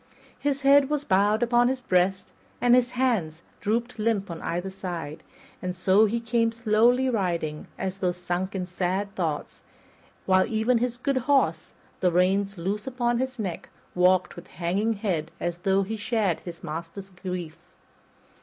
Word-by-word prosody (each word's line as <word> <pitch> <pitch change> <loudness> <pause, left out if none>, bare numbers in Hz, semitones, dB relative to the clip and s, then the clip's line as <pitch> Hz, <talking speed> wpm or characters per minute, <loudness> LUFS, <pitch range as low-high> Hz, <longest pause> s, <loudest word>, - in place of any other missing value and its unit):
His 285 -1 -1
head 275 0 +5
was 300 -1 -1
bowed 205 +3 +3
upon 240 0 +4
his 260 +1 0
breast 185 -2 0 0.3
and 245 0 +4
his 250 0 +3
hands 205 -11 0 0.2
drooped 230 +2 -1
limp 210 -4 0
on 165 - -7
either 175 +3 -3
side; 175 -5 -6 0.4
and 180 -1 -3
so 190 +4 +4
he 225 +2 0
came 230 0 +1
slowly 230 +3 +3
riding, 170 -9 -1
as 190 0 -4
though 180 -2 +1
sunk 180 +2 -3
in 185 -1 -2
sad 190 +2 -2
thoughts, 160 -5 -3 0.6
while 185 0 +4
even 230 +2 +2
his 245 0 -1
good 275 +2 0
horse, 165 - +2 0.3
the 180 - +2
reins 195 +3 +2
loose 200 +6 -3
upon 240 -2 0
his 260 0 -2
neck, 190 -7 -4 0.2
walked 180 +1 +3
with 175 - -11
hanging 190 +6 -1
head, 185 -7 -2
as 175 0 -3
though 195 +2 +2
he 220 +3 -4
shared 210 -5 0
his 170 0 -10
master's 170 +4 -6
grief. 180 -3 -6
195 Hz, 160 wpm, -26 LUFS, 180-235 Hz, 0.6 s, head